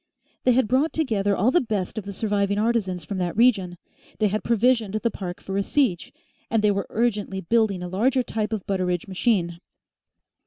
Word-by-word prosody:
They 250 - +5
had 255 -2 +2
brought 265 +7 +1
together 210 -10 0
all 225 +7 +3
the 350 - +4
best 210 -7 -3
of 215 -3 -5
the 200 - -5
surviving 200 0 0
artisans 205 -6 0
from 190 +3 -4
that 180 +1 -2
region, 200 -7 +3 0.4
they 215 -1 +2
had 215 +2 -2
provisioned 230 -2 +2
the 225 +2 0
park 180 -3 -6
for 195 0 -4
a - - +2
siege, 225 - 0 0.4
and 220 -1 +1
they 210 - +4
were 200 -1 -2
urgently 210 -4 -1
building 205 -2 +1
a - - -4
larger 245 +8 +1
type 215 -2 -3
of 215 -4 -3
Butteridge 180 -2 -1
machine. 185 -4 0
210 Hz, 190 wpm, -24 LUFS, 190-235 Hz, 0.4 s, They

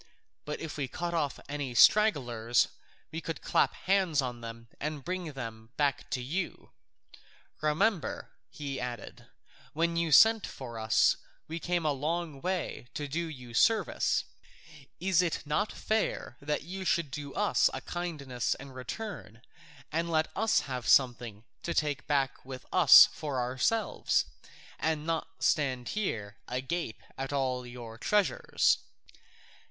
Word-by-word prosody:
But 150 - -4
if 160 -2 -6
we 140 -3 -1
cut 175 +6 -4
off 150 -5 -1
any 140 -4 -4
stragglers, 120 - +4 0.4
we 160 - -4
could 165 - -5
clap - - +2
hands 185 -5 +1
on 125 -3 -2
them 115 0 -8
and 150 -2 -4
bring 180 -4 -3
them 115 -4 -7
back 145 -1 0
to 125 -3 -2
you. 170 +8 -4 0.9
Remember," 165 +6 0 0.2
he 140 -2 -5
added, 120 -4 -6 0.5
"when 170 +2 +1
you 170 -1 0
sent 220 +8 +7
for 120 -4 -8
us, 110 0 +3 0.3
we 165 +2 -4
came 175 -1 -1
a 150 - +3
long 155 +1 -2
way 180 -8 -3
to 145 - -3
do 165 +4 -2
you 125 -6 -9
service; 220 - +2 0.8
is 185 -1 +3
it 170 -3 -2
not 150 +9 0
fair 215 - -1
that 150 +1 -2
you 190 +2 -6
should 170 -5 +1
do 145 0 -6
us 210 0 +3
a - - -4
kindness 150 -9 -3
in 135 +1 -10
return, 130 - -7 0.5
and 165 +2 -1
let 160 -1 +1
us 220 +2 +3
have 130 -3 -5
something 120 -5 +3 0.2
to 170 - -3
take 145 -3 0
back 140 -3 0
with 130 -1 -8
us - - +10
for 145 -4 -3
ourselves, 130 - +1 0.5
and 155 -1 0
not 165 -1 -3
stand 130 -5 +1
here 105 - -3
agape 130 +1 -3 0.2
at 135 +1 -3
all 130 -3 -1
your 120 -2 -9
treasures?" 210 - +2
145 Hz, 140 wpm, -30 LUFS, 125-170 Hz, 0.9 s, us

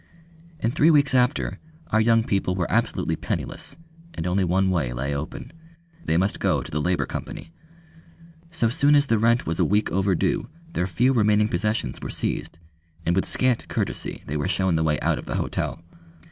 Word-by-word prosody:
And 115 +2 -1
three 155 +2 +4
weeks 145 -4 +4
after 125 +2 +1 0.3
our 110 - +4
young 115 0 +4
people 95 -3 0
were 90 -2 0
absolutely - - 0
penniless, - - -4 0.4
and 80 - -4
only 90 +2 +1
one 95 +2 +2
way 70 -9 0
lay 65 +4 -2
open. 75 +2 -6 0.5
They 80 - +1
must 95 +3 0
go - - +1
to - - -10
the 75 - -1
Labour 90 +2 +1
Company. 80 +1 -7 1.0
So 160 -8 +1
soon 140 +5 +4
as 145 0 +4
the 115 -5 +1
rent 115 +2 +3
was 80 0 -2
a - - +4
week 105 +2 +1
overdue 95 -1 0 0.2
their 90 - 0
few 120 +9 +2
remaining 105 -2 +3
possessions 105 - -1
were - - -5
seized, - - -2 0.5
and 85 - +2
with 95 - +1
scant 130 -2 +1
courtesy - - -3
they 75 - -3
were 75 - -1
shown 95 -2 +1
the 80 - +1
way 75 -1 +1
out - - +1
of - - -10
the - - -3
hotel. 85 - -2
95 Hz, 190 wpm, -24 LUFS, 85-115 Hz, 1.0 s, three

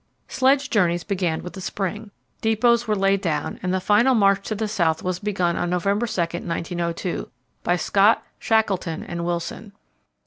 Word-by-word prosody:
Sledge 270 +1 +2
journeys 175 -5 +2
began 180 -5 -1
with 180 - -7
the 190 - -8
spring. 205 +3 -4 0.3
Depots 235 +2 +2
were 215 - +2
laid 195 0 +2
down, 155 -5 -2
and 185 - -1
the 190 - +1
final 215 +7 +4
march 200 -2 +3
to 215 - -2
the 215 +1 -2
South 170 -7 0
was 180 -1 -2
begun 185 -4 0
on 175 - -1
November 200 +6 0
2, 220 - -4
1902, 170 +1 -3 0.3
by 175 - +1
Scott, 200 +4 +3 0.2
Shackleton, 195 -7 0
and 170 0 -5
Wilson. 175 +4 -4
195 Hz, 165 wpm, -23 LUFS, 175-215 Hz, 0.3 s, final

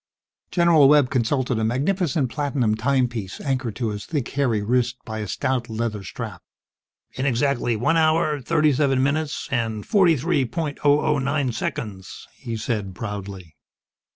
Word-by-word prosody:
General 170 -5 +5
Webb 145 -3 +5
consulted 125 -1 0
a - - 0
magnificent 140 - 0
platinum 135 -4 0
timepiece 120 -4 -1
anchored 130 -6 -2
to 120 -3 -2
his 105 -1 -5
thick 145 -7 -2
hairy 125 -7 0
wrist 120 +2 +1
by 110 -2 -5
a 105 - -4
stout 125 +3 -1
leather 110 -2 -3
strap. 90 - -7 0.7
"In 130 +1 -2
exactly 120 -2 +1
one 125 +10 +1
hour, 155 -2 +2
thirty 150 +2 +2
seven 135 -1 +2
minutes, 145 +1 -1
and 115 -4 -1
forty 185 -7 +4
three 135 +1 +1
point 145 +4 -4
oh 145 0 +4
oh 150 -2 +1
nine 140 -1 0
seconds!" 105 -4 -5
he 115 -1 -5
said, 105 -4 -3
proudly. 100 -5 -7
130 Hz, 155 wpm, -23 LUFS, 110-145 Hz, 0.7 s, General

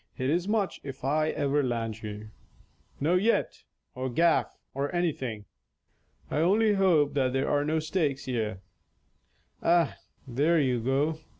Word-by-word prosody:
It 130 +2 0
is 175 +3 0
much 210 -2 0
if 135 -2 -8
I 155 +3 +1
ever 145 -1 +1
land 115 -4 -2
you. 105 0 -7 0.7
No 165 +6 +2
net, 220 +5 0 0.3
or 130 +1 -3
gaff, 165 +6 +2 0.2
or 140 +2 -2
anything. 130 -11 -2 0.9
I - - -1
only 210 +6 +3
hope 175 -7 +3
that 130 -3 +1
there 135 +1 0
are 145 0 +2
no 155 +2 0
stakes 155 -3 -1
here. 110 -6 -2 1.0
Ah, 170 -2 +3 0.3
there 150 +7 +2
you 130 -4 +1
go! 140 +6 0
145 Hz, 140 wpm, -28 LUFS, 130-165 Hz, 1.0 s, only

